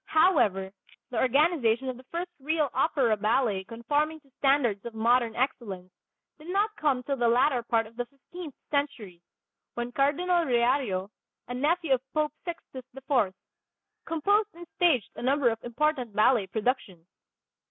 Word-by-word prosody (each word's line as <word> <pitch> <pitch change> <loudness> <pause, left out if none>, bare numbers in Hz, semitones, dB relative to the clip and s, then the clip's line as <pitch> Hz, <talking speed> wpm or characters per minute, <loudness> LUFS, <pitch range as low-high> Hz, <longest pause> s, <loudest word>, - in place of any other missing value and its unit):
However, 215 - +3 0.4
the 245 - -1
organization 265 -3 +2
of 255 - -2
the 255 +1 -14
first 345 +5 -5
real 300 0 0
opera 260 -5 +2
ballet 215 -1 +1
conforming 290 +9 -1
to 275 -2 -28
standards 265 -8 +2
of 235 -1 -8
modern 230 0 +2
excellence 210 -8 -3 0.5
did 305 - -13
not 415 +3 +1
come 275 -7 0
till 275 +1 -2
the 240 -1 +2
latter 250 +2 +3
part 230 -1 +1
of 220 +1 -15
the 245 -1 -3
fifteenth 290 +3 -10 0.2
century, 270 - -2 0.5
when 240 0 -3
Cardinal 340 +7 +2
Riario, 240 - +1 0.4
a 245 - -5
nephew 300 +3 +1
of 260 0 -3
Pope 305 -1 +1
Sixtus 330 -7 -7
IV, 255 -8 0 0.7
composed 400 +6 +1
and 345 0 -10
staged 300 - +2
a - - -6
number 265 0 +3
of 225 0 -6
important 250 -2 -1
ballet 215 -1 +4
productions. 210 -5 -2
260 Hz, 150 wpm, -28 LUFS, 230-300 Hz, 0.7 s, ballet